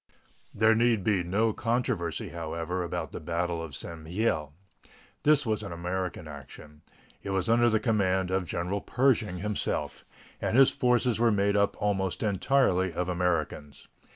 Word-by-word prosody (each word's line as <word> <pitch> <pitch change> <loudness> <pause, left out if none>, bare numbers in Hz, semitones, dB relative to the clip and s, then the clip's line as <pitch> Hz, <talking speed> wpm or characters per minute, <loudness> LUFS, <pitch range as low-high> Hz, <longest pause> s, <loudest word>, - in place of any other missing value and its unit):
There 110 +1 +4
need 115 -3 +2
be 100 -2 +2
no 105 +6 +1
controversy, 115 -6 -1
however, 85 +2 -4
about 85 - -4
the - - -6
battle 85 +1 -2
of 80 -4 -7
St. 80 +2 -7
Mihiel. 80 -4 -1 0.7
This 150 -2 +4
was 110 -2 0
an 100 - -7
American 90 0 -4
action. 75 +1 -11 0.4
It - - -7
was 95 -2 -1
under 120 +1 +4
the 110 -1 +2
command 95 -5 +1
of 95 -1 0
General 90 +5 -2
Pershing 115 -8 +1
himself, 105 +3 -3 0.4
and 115 - 0
his 135 -1 +7
forces 125 -2 +1
were 120 -1 +4
made 100 0 +2
up 100 0 +1
almost 95 -2 -1
entirely 95 -3 +2
of 90 +2 -3
Americans. 85 -5 -2
95 Hz, 155 wpm, -28 LUFS, 85-110 Hz, 0.7 s, his